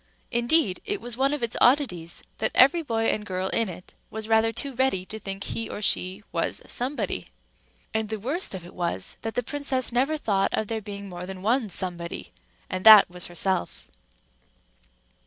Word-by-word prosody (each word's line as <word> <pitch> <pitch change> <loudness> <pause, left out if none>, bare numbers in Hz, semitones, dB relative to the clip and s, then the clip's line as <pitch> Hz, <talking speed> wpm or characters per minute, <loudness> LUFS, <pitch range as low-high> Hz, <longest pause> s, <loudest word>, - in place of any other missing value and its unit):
Indeed, 240 - +3
it 410 -1 -2
was 240 -1 -6
one 270 +2 +2
of 295 -4 -3
its 235 - -1
oddities 225 - +2 0.2
that - - +2
every 280 +7 +6
boy 225 -7 -1
and 210 - -2
girl 185 -2 -3
in 230 -3 0
it, 180 0 -10 0.2
was 220 0 -5
rather 225 0 +3
too 275 +4 -4
ready 250 -8 +1
to 220 +3 -7
think 195 -1 -5
he 225 - -3
or - - -5
she 190 -1 -1
was - - -1
Somebody; 240 - -2 0.7
and 220 -1 -1
the 220 - -2
worst 275 - -1
of 180 -2 -8
it 175 - -12
was 170 - -2
that 225 0 -5
the 245 - 0
princess 270 -1 -1
never 270 +6 +1
thought 195 -8 +1
of 220 - -2
there 225 -1 -2
being 200 -1 -7
more 180 -1 -7
than 190 -1 -8
one 230 +1 +1
Somebody—and 175 - -4
that 215 -4 +9
was 180 0 -5
herself. 175 - -2
220 Hz, 180 wpm, -26 LUFS, 185-245 Hz, 0.7 s, that